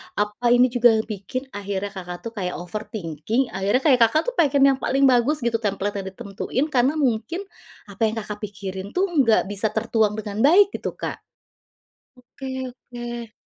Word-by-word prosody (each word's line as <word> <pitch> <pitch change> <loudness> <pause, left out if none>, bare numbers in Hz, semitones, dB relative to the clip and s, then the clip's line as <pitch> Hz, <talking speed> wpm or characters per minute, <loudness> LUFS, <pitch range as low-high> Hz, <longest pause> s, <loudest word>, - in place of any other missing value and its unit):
Apa 210 +3 -2
ini 250 0 +4
juga 245 -1 +5
bikin, 215 +5 -5
akhirnya, 200 0 -4
Kakak, 180 -2 -7
tuh 230 - -4
kayak 180 -2 -2
overthinking. 195 - -3
Akhirnya, 195 +7 +1 0.2
Kakak, 230 +7 +4
tuh, - - -19
pengen 280 -3 +4
yang - - -15
paling 275 +1 +1
bagus 250 +5 +3
gitu 235 -1 +1
template 205 -1 -2
yang 190 - -6
ditentuin 200 +8 -3
karena 255 +3 +3
mungkin, 260 - 0 0.5
apa 200 - -15
yang, 220 - -3
Kakak, 210 0 -7
pikirin 195 -1 -6
tuh, 380 +2 +3 0.2
nggak 230 -3 +4
bisa 205 +2 0
tertuang 220 -1 +1
dengan 210 -1 -5
baik, 395 +5 +6
gitu, - - -5
Kak? - - -5 1.0
Oke 250 +2 -13 0.3
oke. 240 -2 -8
220 Hz, 160 wpm, -23 LUFS, 200-250 Hz, 1.0 s, baik